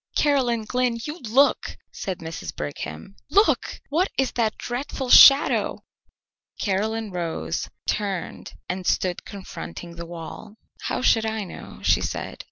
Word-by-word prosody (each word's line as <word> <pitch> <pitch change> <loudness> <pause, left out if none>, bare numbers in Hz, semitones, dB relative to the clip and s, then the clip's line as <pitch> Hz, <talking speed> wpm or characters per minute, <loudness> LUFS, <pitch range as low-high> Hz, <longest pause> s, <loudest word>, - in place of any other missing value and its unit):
"Caroline 255 -6 +2
Glynn, 250 +1 0
you 300 +6 -5
look!" 265 +4 +2
said 190 -4 -4
Mrs. 160 - -6
Brigham. 75 - -6
"Look! 410 +2 +2
What 345 +7 +1
is 265 -1 +2
that 225 -3 0
dreadful 250 +1 -4
shadow?" 275 0 +7 0.8
Caroline 215 +2 -1
rose, 165 - -3 0.2
turned, 200 -4 -3
and 180 0 -4
stood 180 -2 0
confronting 170 - -8
the 170 0 -6
wall. 175 +5 -9 0.3
"How - - -2
should 225 -2 +4
I 220 -1 -2
know?" 185 - -10
she - - +4
said. - - -4
215 Hz, 130 wpm, -24 LUFS, 175-250 Hz, 0.8 s, shadow